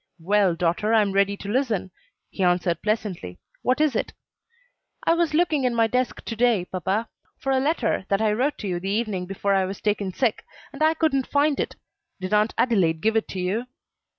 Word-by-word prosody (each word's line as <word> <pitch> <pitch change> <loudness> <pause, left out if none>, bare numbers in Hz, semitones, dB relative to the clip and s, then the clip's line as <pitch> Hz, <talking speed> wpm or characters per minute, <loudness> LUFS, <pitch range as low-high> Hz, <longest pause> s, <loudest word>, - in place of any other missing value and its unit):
"Well, 190 +1 +2
daughter, 180 +6 +1
I 220 - +5
am 200 - -1
ready 200 +1 +2
to 200 - -9
listen," 220 -5 -1 0.4
he - - -6
answered 175 -2 +2
pleasantly; 205 - -2 0.2
"what 255 +3 +1
is 305 -5 +2
it?" - - -2 0.9
"I - - +5
was 335 -2 +1
looking 315 -4 +2
in 250 -2 +1
my 230 -1 +4
desk 250 +3 -1
to 230 - -4
day, 225 -5 +2
papa, 190 +5 -2 0.3
for 270 - -2
a 265 - +3
letter 280 - 0
that 195 - +2
I 215 -1 +2
wrote 265 +7 0
to 210 - -4
you 175 -2 -1
the 190 +2 -4
evening 205 -4 -1
before 195 +1 -1
I 190 -1 +2
was 190 +1 -6
taken 205 -2 -1
sick, 230 +3 0 0.3
and - - -9
I 315 +1 +4
couldn't 275 -5 +1
find 285 0 +2
it. - - -2 0.4
Did 185 +2 -4
Aunt 210 +1 +2
Adelaide 175 -10 +2
give 220 +1 +1
it 225 - +1
to 190 - -5
you?" 200 +7 -1
210 Hz, 205 wpm, -24 LUFS, 190-255 Hz, 0.9 s, I